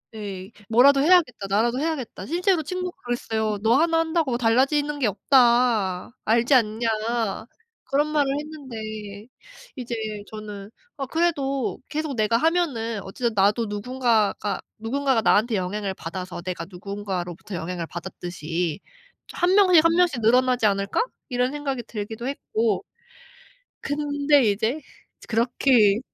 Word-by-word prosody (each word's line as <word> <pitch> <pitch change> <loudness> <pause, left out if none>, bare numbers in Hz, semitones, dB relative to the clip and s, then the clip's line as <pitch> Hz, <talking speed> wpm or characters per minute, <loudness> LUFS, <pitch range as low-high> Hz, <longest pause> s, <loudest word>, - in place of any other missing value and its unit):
예. 200 -1 -7 0.2
'뭐라도 275 +4 +6
해야겠다. 305 - +3
나라도 235 +5 +1
해야겠다.' 285 - -3
실제로 355 +2 +1
친구가 365 +3 -4
그랬어요. 220 -3 -1
"너 230 +3 +4
하나 325 +2 +3
한다고 320 -6 0
달라지는 275 +5 +2
게 245 - +2
없다. 235 -5 +2
알지 235 +5 +3
않냐?" 230 -1 +2 1.0
그런 280 +3 +1
말을 290 -3 +1
했는데 220 -8 -8 0.5
이제 240 -2 -5 0.3
저는 210 -1 -8 0.3
아 270 - -3
그래도 275 -4 -1
계속 305 -3 -3
내가 220 +1 +2
하면은 255 - 0
어쨌든 230 +4 -3
나도 210 +3 +2
누군가가 215 -1 0 0.2
누군가가 260 +1 0
나한테 220 +2 +3
영향을 195 +1 -2
받아서 180 +1 -6
내가 175 -2 -5
누군가로부터 190 -1 -5
영향을 170 0 -4
받았듯이 175 -2 -4 0.5
'1 360 +2 +2
명씩 365 -6 +6
1 330 - +5
명씩 340 -9 +2
늘어나지 250 +1 +3
않을까?' 200 - +1 0.3
이런 250 +1 0
생각이 275 -4 -3
들기도 220 +2 -6
했고. 230 - -1 1.0
근데 290 -1 +2
이제 225 +9 -1 0.5
그렇게 230 -2 +3
235 Hz, 295 characters per minute, -24 LUFS, 205-285 Hz, 1.0 s, 뭐라도